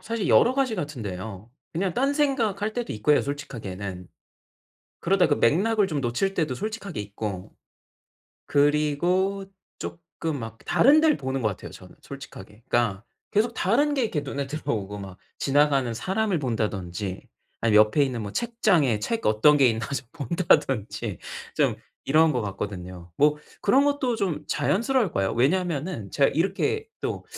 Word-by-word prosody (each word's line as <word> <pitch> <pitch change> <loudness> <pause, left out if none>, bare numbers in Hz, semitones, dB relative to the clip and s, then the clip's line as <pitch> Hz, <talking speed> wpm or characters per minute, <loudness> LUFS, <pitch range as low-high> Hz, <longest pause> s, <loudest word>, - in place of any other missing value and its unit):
사실 225 -3 -3
여러 245 - +5
가지 265 -4 +1
같은데요. 110 - -6 0.2
그냥 180 +2 -1
딴생각할 255 -7 +1
때도 240 +1 -3
있고요, 115 +8 +3
솔직하게는. 100 -10 -6 0.9
그러다 185 0 +3
그 145 - +2
맥락을 205 +7 +3
좀 150 -6 -2
놓칠 130 +11 0
때도 155 -8 -1
솔직하게 205 - -5
있고 100 -2 -6 1.0
그리고 150 +7 +2 0.3
쪼끔 85 - -5
막 115 -2 -7
다른 290 +5 +5
데를 315 -2 +4
보는 130 0 -3
것 110 - +3
같아요, 95 - -7
저는 - - -13
솔직하게. 105 +2 -11
그러니까 115 -4 0 0.3
계속 225 +3 +1
다른 285 +10 +2
게 270 - +1
이렇게 195 -10 0
눈에 140 -1 -4
들어오고 110 -9 -3
막 95 -2 -8 0.2
지나가는 140 -3 +2
사람을 195 - 0
본다든지 105 - -3 0.3
아니면 110 -2 +6
옆에 105 +7 +1
있는 125 -4 -3
뭐 100 -1 -6
책장에 185 - +2
책 230 - -2
어떤 110 +8 +5
게 135 -3 +5
있나 115 -1 -1
좀 140 -2 -4
본다든지 135 - 0 0.4
좀 - - +2 0.3
이런 155 +2 +4
것 125 - 0
같거든요. 90 -4 -6
뭐 150 +1 +4 0.2
그런 265 +7 +4
것도 285 -4 +1
좀 175 -8 -2
자연스러울 210 - +1
거예요. 95 0 0
왜냐하면은 150 - 0
제가 140 - +3
이렇게 200 - 0
또 - - -3
145 Hz, 330 characters per minute, -25 LUFS, -, 1.0 s, 아니면